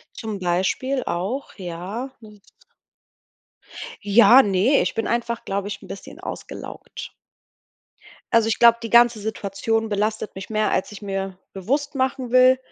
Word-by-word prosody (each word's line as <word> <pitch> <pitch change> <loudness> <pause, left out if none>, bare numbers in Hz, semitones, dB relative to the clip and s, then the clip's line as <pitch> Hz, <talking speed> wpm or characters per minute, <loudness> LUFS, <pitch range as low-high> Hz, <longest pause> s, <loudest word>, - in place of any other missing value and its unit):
Zum 215 -2 -5
Beispiel 190 +9 0
auch, 200 +11 -3
ja, 190 +9 -5
und 210 -2 -15 1.6
Ja, 230 +5 +7
ne, 205 +7 +3
ich - - -2
bin 225 - -1
einfach, 235 0 -2
glaube 200 +1 -3
ich, 200 -1 -6
'n - - -13
bisschen 195 - -10
ausgelaugt. - - -8 1.2
Also 225 -1 +4
ich 225 - 0
glaube, 235 0 +6
die 230 - -4
ganze 235 -1 +5
Situation 220 +1 -2
belastet 210 +1 -1
mich 190 0 -8
mehr, 215 -1 0
als 190 - -1
ich 210 0 -11
mir 195 -2 -4
bewusst 280 +10 -2
machen 260 -1 -1
will. 255 0 +6
220 Hz, 140 wpm, -22 LUFS, 195-240 Hz, 1.6 s, Ja